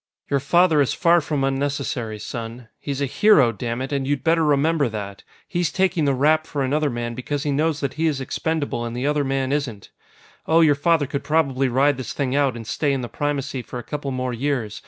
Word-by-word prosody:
"Your 140 - +3
father 160 +2 +3
is 135 - +1
far 170 0 +4
from 150 -2 -2
unnecessary, 135 -4 -2
son. 115 +2 -7
He's 140 -1 -4
a - - +2
hero, 140 - +4
dammit, 120 +5 -4
and 135 -2 -1
you'd 145 -2 -1
better 165 0 +3
remember 150 -1 +2
that! 100 -2 -6 0.2
He's 175 -4 -1
taking 180 -3 +1
the 140 - +2
rap 155 +4 +2
for 145 -3 -2
another 145 +3 +1
man 120 -1 -4
because 135 +4 -3
he 145 - -1
knows 155 +2 0
that 140 - -2
he 160 +2 0
is 145 -4 0
expendable 145 -1 -2
and 120 0 -5
the 125 - -2
other 145 0 +1
man 135 -1 -1
isn't. 135 -9 -3 0.6
"Oh, 165 +1 +5
your 155 -3 +5
father 150 +1 +2
could 140 +1 -4
probably 140 -3 +1
ride 135 +3 +2
this 130 - -5
thing 135 -2 -1
out 140 -3 +2
and 115 -1 -7
stay 140 +6 0
in 135 - -1
the 120 - -5
Primacy 140 -3 -2
for 125 - -8
a 120 - -6
couple 145 -2 -5
more 130 -1 -2
years. 120 -4 -2
140 Hz, 220 wpm, -22 LUFS, 125-150 Hz, 0.6 s, Oh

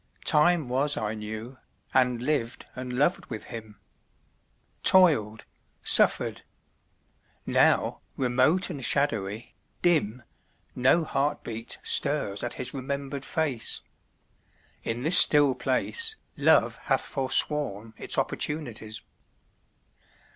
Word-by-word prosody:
Time 155 -1 +3
was 135 +4 -1
I 105 0 -2
knew, 110 +4 -8 0.3
and 125 -2 +1
lived 130 -5 -2
and 125 0 -6
loved 145 +8 0
with 110 -4 -7
him; 110 -2 -10 1.0
Toiled, 140 - +3 0.4
suffered. - - +3 1.0
Now, - - +2 0.2
remote 130 +9 +1
and 140 -5 -7
shadowy, 115 -6 0 0.3
dim, 130 -9 +1 0.5
No 130 +7 +3
heartbeat 120 -7 -3
stirs 140 -9 +1
at - - -4
his 130 0 -4
remembered 140 0 -5
face. 145 -8 -1 1.0
In 115 +2 -3
this 175 +5 +8
still 145 -3 +6
place 135 - -1 0.2
Love - - +3
hath - - +1
forsworn 130 -5 -1
its - - -3
opportunities. 120 -8 -3
130 Hz, 95 wpm, -26 LUFS, 115-150 Hz, 1.0 s, this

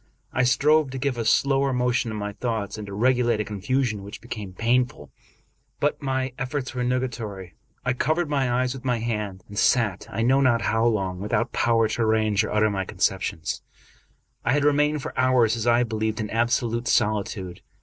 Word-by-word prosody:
I 130 - +1
strove 140 +4 +3
to 135 - -5
give 130 -2 -1
a - - 0
slower 135 +3 +3
motion 125 -1 +1
to 110 - -4
my 105 -1 -3
thoughts, 110 -3 -3
and 105 -1 -7
to 100 - -7
regulate 120 +1 +2
a 105 - -1
confusion 110 +2 -1
which 100 +2 -9
became 105 -5 -7
painful; 115 - 0 0.7
but 145 +1 0
my 130 -2 -1
efiforts 135 -1 -3
were 125 -1 -2
nugatory. 120 -7 -3 0.3
I 130 - +2
covered 155 +6 0
my 135 -4 0
eyes 125 +1 +1
with 135 -2 -9
my 125 -2 +1
hand, 105 -5 -3
and 105 0 -4
sat, 105 -7 +2
I 115 +1 -2
know 130 +3 +4
not 120 -4 +3
how 110 +1 +2
long, 95 -5 -1
with 105 +2 -5
out 115 0 +1
power 115 -1 +2
to 110 - -2
arrange 110 -2 +2
or - - -4
utter 105 0 +2
my 95 -1 -1
conceptions, 80 -3 -2 0.8
I 120 - +2
had 145 0 +2
remained 150 0 +2
for - - -5
hours, 125 -3 +3
as 115 0 -3
I 120 +1 +4
believed, 110 -1 -2
in 105 -1 -3
absolute 120 +1 0
soli 105 -1 +2
tude. 95 -4 -7
120 Hz, 195 wpm, -24 LUFS, 105-130 Hz, 0.8 s, know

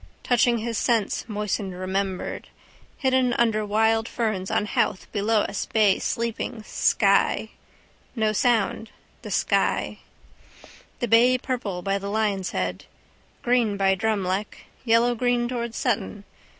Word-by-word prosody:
Touched 245 0 +3
his 235 -2 0
sense 230 -5 0
moistened 205 -2 -3
remembered. 190 +1 -3 0.5
Hidden 260 -2 +2
under 225 -3 +1
wild 220 +2 +1
ferns 215 -5 -2
on - - 0
Howth 185 -4 -1
below 210 +1 +1
us 200 -1 -3
bay 210 -3 +3
sleeping: 230 0 -3
sky. 200 +1 +2 0.7
No 220 -2 +1
sound. 225 -1 +1 0.3
The - - -8
sky. - - 0 1.0
The 240 - 0
bay 240 +3 +5
purple 235 -9 -4
by 195 0 0
the 200 0 -5
Lion's 200 -4 0
head. 90 - -3 0.6
Green 240 -4 +2
by 195 -1 +3
Drumleck. 200 -1 -2 0.2
Yellowgreen 240 +1 +2
towards 235 -2 -4
Sutton. 215 -4 -2
220 Hz, 120 wpm, -24 LUFS, 200-235 Hz, 1.0 s, bay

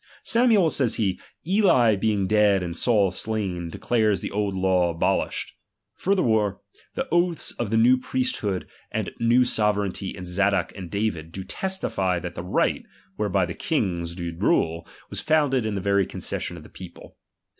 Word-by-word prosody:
Samuel, 230 -8 +4
says 130 -5 +2
he, 95 -4 -1 0.3
Eli 170 - +4
being 100 -1 0
dead 105 -1 +3
and 85 -1 -4
Saul 105 -3 +2
slain, 95 -4 -2
declares 110 +1 +1
the - - -5
old 100 -1 -1
law 95 -2 +2
abolished. 85 -1 -1 0.4
Furthermore, 110 - +1 0.4
the - - -2
oaths 175 -1 +1
of 120 -3 -1
the 110 - +1
new 125 +3 +5
priesthood 125 -7 -2 0.2
and - - -2
new 120 +2 +4
sovereignty 105 -5 -1
in 90 - -7
Zadok 100 +3 0
and 95 -3 -7
David, 100 -6 -2
do 95 +2 -6
testify 95 - -1
that 90 0 -5
the - - -6
right, 90 - +1 0.4
whereby - - +1
the - - -5
kifigs 85 -3 -2
did 85 -2 -6
rule, 80 +1 +1 0.2
was - - -1
founded 145 -7 +2
in 105 - -2
the 100 - -2
very 100 -1 +2
concession - - -4
of - - -11
the - - -14
people. - - -12
105 Hz, 160 wpm, -24 LUFS, 95-120 Hz, 0.4 s, new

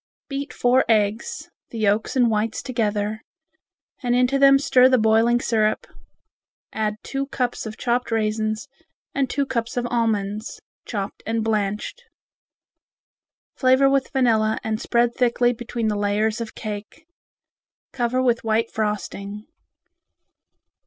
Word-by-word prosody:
Beat 280 +1 -4
four 250 +2 +3
eggs, 215 0 0 0.2
the 230 - -8
yolks 215 +2 +1
and 250 -2 +4
whites 215 +1 -1
together, 215 -3 -1 0.8
and 245 -2 +1
into 250 +2 +2
them 275 0 +7
stir 260 -3 +5
the 255 - +4
boiling 225 +2 +3
syrup, 215 -3 0 0.9
add 215 -1 -1
two 275 0 -3
cups 250 -4 -2
of 220 - -8
chopped 245 +1 -1
raisins 215 +1 -1 0.5
and 270 -2 0
two 280 -1 0
cups 235 -3 -3
of 245 - 0
almonds, 215 -2 -1 0.3
chopped 200 -3 -4
and 225 0 0
blanched. 210 - -2 1.5
Flavor 260 +1 +4
with 275 -1 +1
vanilla 225 -5 +2
and 220 0 -2
spread 235 0 +1
thickly 245 0 +2
between 235 -1 -4
the 210 - 0
layers 210 +2 0
of 225 - -6
cake. 215 +8 -7 0.9
Cover 255 0 0
with 240 -2 +1
white 225 +1 0
frosting. 210 -1 -4
230 Hz, 125 wpm, -23 LUFS, 215-250 Hz, 1.5 s, them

